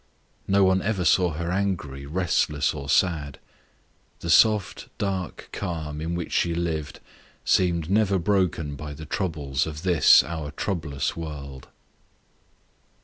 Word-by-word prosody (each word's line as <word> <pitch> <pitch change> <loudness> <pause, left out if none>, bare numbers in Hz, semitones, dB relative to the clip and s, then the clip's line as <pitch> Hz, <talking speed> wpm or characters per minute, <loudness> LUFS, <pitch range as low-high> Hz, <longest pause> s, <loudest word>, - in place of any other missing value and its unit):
No 100 0 +4
one 95 0 +3
ever 100 -3 -1
saw 90 -2 +4
her 85 +3 -3
angry, 90 -8 -2
restless, 80 -3 0
or 70 -2 -7
sad. 75 -5 +1 0.8
The 85 - -1
soft 105 +1 +3
dark 95 -3 -4
calm 80 -5 -4
in 85 +2 -2
which 85 -1 -4
she 85 -1 +1
lived 80 -3 -3 0.5
seemed 85 -3 +2
never 100 0 +2
broken 85 -5 0
by 75 0 -7
the 80 +2 -9
troubles 75 -7 -2
of 75 +1 -7
this 90 -6 +6
our 80 -3 -5
troublous 75 -3 -3
world. 70 -5 -7
85 Hz, 130 wpm, -25 LUFS, 75-95 Hz, 0.8 s, this